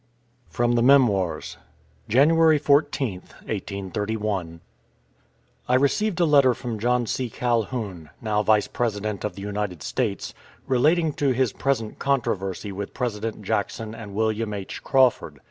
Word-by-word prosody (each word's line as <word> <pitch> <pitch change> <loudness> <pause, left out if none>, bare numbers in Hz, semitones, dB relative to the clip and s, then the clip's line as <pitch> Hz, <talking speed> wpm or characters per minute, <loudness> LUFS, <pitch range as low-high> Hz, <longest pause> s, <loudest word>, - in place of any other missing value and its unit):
FROM 120 0 +1
THE 120 - +2
MEMOIRS 120 -9 +3 0.5
JANUARY 155 +6 +5
14TH, 140 -9 +1 0.2
1831. 100 -3 -3 1.1
I 125 - +4
received 175 +9 +1
a 175 - +4
letter 140 -5 +5
from 120 -4 -5
John 120 +2 +1
C. 125 +2 -2
Calhoun, 110 - -2
now 105 -2 0
Vice 105 -1 +3
President 105 -3 -2
of 105 - -3
the 100 - -8
United 100 -5 -4
States, 110 -2 -2 0.3
relating 155 +5 +2
to 140 -2 +1
his 125 -3 +1
present 130 -5 -2
controversy 105 -8 -1
with 100 +1 -6
President 110 -2 -3
Jackson 105 +2 -2
and 105 -3 -9
William 110 0 -1
H. 100 -2 -6
Crawford. 125 - +2
115 Hz, 130 wpm, -24 LUFS, 100-130 Hz, 1.1 s, JANUARY